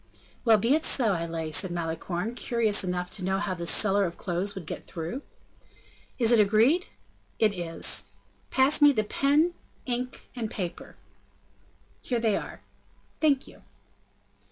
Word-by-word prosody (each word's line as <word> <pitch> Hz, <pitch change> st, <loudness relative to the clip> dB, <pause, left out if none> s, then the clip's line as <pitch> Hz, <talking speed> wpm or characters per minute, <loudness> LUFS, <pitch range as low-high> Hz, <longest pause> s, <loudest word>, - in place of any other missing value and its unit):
"Well, 225 Hz, -3 st, +6 dB
be 230 Hz, +6 st, +2 dB
it 315 Hz, +1 st, +2 dB
so; 230 Hz, -10 st, +2 dB
I 170 Hz, -1 st, -2 dB
lay," 165 Hz, -1 st, -4 dB
said 185 Hz, +3 st, +2 dB
Malicorne, 175 Hz, +5 st, -3 dB
curious 230 Hz, -4 st, +1 dB
enough 180 Hz, -1 st, -3 dB
to 195 Hz, -, -5 dB
know 190 Hz, +1 st, 0 dB
how 195 Hz, -1 st, -2 dB
this 170 Hz, -2 st, -2 dB
seller 200 Hz, -1 st, +3 dB
of 170 Hz, -1 st, -5 dB
clothes 190 Hz, +3 st, -2 dB
would 190 Hz, -4 st, -7 dB
get -, -, -6 dB
through. 170 Hz, -, -5 dB, 1.0 s
"Is 235 Hz, -2 st, +3 dB
it 235 Hz, -, +6 dB
agreed?" 225 Hz, -, +4 dB, 0.5 s
"It 215 Hz, -2 st, +3 dB
is." 170 Hz, -3 st, 0 dB, 0.4 s
"Pass 265 Hz, +4 st, +3 dB
me 290 Hz, -1 st, +7 dB
the 215 Hz, -4 st, +1 dB
pen, 290 Hz, +9 st, +2 dB, 0.3 s
ink, 250 Hz, 0 st, -4 dB
and 230 Hz, -3 st, -3 dB
paper." 180 Hz, -5 st, -6 dB, 1.1 s
"Here 245 Hz, -2 st, -1 dB
they 220 Hz, -3 st, +2 dB
are." -, -, -6 dB, 0.6 s
"Thank 285 Hz, -4 st, +2 dB
you." -, -, -16 dB
210 Hz, 155 wpm, -27 LUFS, 180-245 Hz, 1.1 s, me